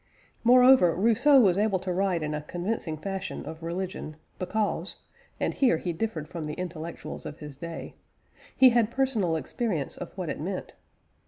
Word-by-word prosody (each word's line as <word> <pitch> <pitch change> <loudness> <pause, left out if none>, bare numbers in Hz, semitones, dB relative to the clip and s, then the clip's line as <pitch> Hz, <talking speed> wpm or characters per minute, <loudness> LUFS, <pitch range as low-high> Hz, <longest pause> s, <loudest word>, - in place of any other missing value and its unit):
Moreover, 250 -6 +6
Rousseau 235 - +5
was 195 -5 +4
able 210 -2 +2
to 185 0 -3
write 185 -3 0
in 150 0 -2
a 150 - -2
convincing 175 0 -3
fashion 195 +4 -5
of 160 +1 -8
religion, 170 -2 -4 0.2
because 205 +3 -2 0.4
(and - - 0
here 250 - +3
he 175 +1 -3
differed 165 -4 -3
from 165 -1 -6
the 150 - -4
intellectuals 170 -2 -6
of 150 - -7
his 150 -2 -9
day) 165 +3 -7 0.6
he 260 - +8
had 235 -2 +3
personal 235 -10 +1
experience 160 - -2
of - - -7
what - - -3
it - - -4
meant. - - -4
185 Hz, 165 wpm, -27 LUFS, 160-225 Hz, 0.6 s, he